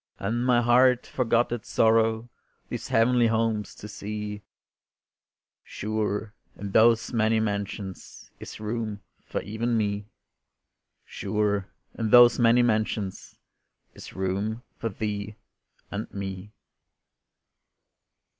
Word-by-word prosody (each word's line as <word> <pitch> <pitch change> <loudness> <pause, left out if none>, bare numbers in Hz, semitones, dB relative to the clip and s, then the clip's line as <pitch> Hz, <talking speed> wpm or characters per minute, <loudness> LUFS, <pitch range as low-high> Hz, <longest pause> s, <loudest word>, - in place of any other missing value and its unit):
And 115 +5 -1
my 125 -1 +3
heart 125 +1 +4
forgot 120 -2 +1
its 120 -2 -5
sorrow 110 0 +3 0.4
These - - -5
heavenly 120 +1 +3
homes 110 -2 0
to 105 - -9
see 105 0 -6 1.2
Sure 105 0 -3 0.2
in 100 -1 -6
those 115 +3 +4
many 110 -1 +2
mansions 100 -2 -5
Is - - -9
room 110 -1 -4 0.2
for - - -4
even 115 +3 -1
me, 105 -1 -1 1.0
Sure 105 -2 -1 0.3
in 115 -2 -2
those 120 +1 +7
many 120 +1 +5
mansions, 110 -4 -1 0.6
Is - - -11
room 100 +5 -2
for 115 - -3
thee 105 0 -4 0.6
and 105 +1 -5
me. 95 0 -6
110 Hz, 105 wpm, -26 LUFS, 105-115 Hz, 1.2 s, those